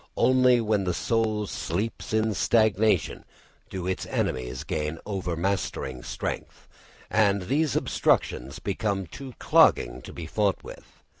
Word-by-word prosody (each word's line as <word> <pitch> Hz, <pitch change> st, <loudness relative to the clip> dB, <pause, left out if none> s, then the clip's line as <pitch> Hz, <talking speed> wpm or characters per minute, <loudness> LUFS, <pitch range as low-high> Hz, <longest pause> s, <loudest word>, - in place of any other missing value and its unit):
Only 125 Hz, 0 st, +5 dB
when 105 Hz, -3 st, +1 dB
the 90 Hz, -2 st, 0 dB
soul 110 Hz, -2 st, 0 dB
sleeps 105 Hz, +7 st, -3 dB
in 110 Hz, 0 st, +1 dB
stagnation 110 Hz, +1 st, +2 dB, 0.5 s
do 95 Hz, -2 st, -5 dB
its 95 Hz, 0 st, -2 dB
enemies 65 Hz, 0 st, -2 dB
gain 75 Hz, +1 st, -3 dB
overmastering 90 Hz, -8 st, -2 dB
strength, -, -, -5 dB, 0.4 s
and 100 Hz, -3 st, +3 dB
these 145 Hz, -, +1 dB
obstructions 65 Hz, +3 st, +1 dB
become 100 Hz, -1 st, -2 dB
too 130 Hz, -, -9 dB
clogging -, -, +4 dB
to -, -, -10 dB
be 85 Hz, -, -7 dB
fought 100 Hz, +3 st, 0 dB
through. -, -, -8 dB
100 Hz, 125 wpm, -26 LUFS, 85-110 Hz, 0.5 s, Only